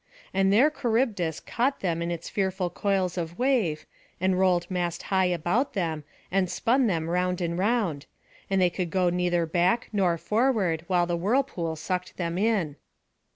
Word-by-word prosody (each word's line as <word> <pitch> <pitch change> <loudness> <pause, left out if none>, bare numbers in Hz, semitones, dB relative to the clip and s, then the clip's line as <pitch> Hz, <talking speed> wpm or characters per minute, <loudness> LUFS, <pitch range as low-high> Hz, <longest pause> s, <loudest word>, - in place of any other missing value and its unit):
And 195 0 +3
there 255 +9 +5
Charybdis 225 - 0
caught 265 +4 -1
them 170 -3 -1
in 170 - -2
its 170 -1 -4
fearful 190 -2 -1
coils 190 -2 0
of 170 +1 -5
wave, 230 - +1 0.3
and 185 0 +1
rolled 180 -2 +3
mast 175 -2 -2
high 190 -1 +4
about 180 - 0
them, 160 -5 -2 0.3
and 190 -1 +1
spun 250 +6 +2
them 165 -5 -1
round 180 +1 0
and 170 -1 -1
round; 190 -7 0 0.4
and 195 -1 +2
they 180 -1 +3
could 180 -1 -3
go 180 0 +2
neither 175 -1 +1
back 175 +7 +1
nor 185 -5 +2
forward, 210 -6 +1
while 180 -2 +2
the 175 0 -1
whirlpool 185 -5 0
sucked 180 +3 -4
them 170 0 -2
in. 195 -9 0
180 Hz, 165 wpm, -26 LUFS, 170-205 Hz, 0.4 s, there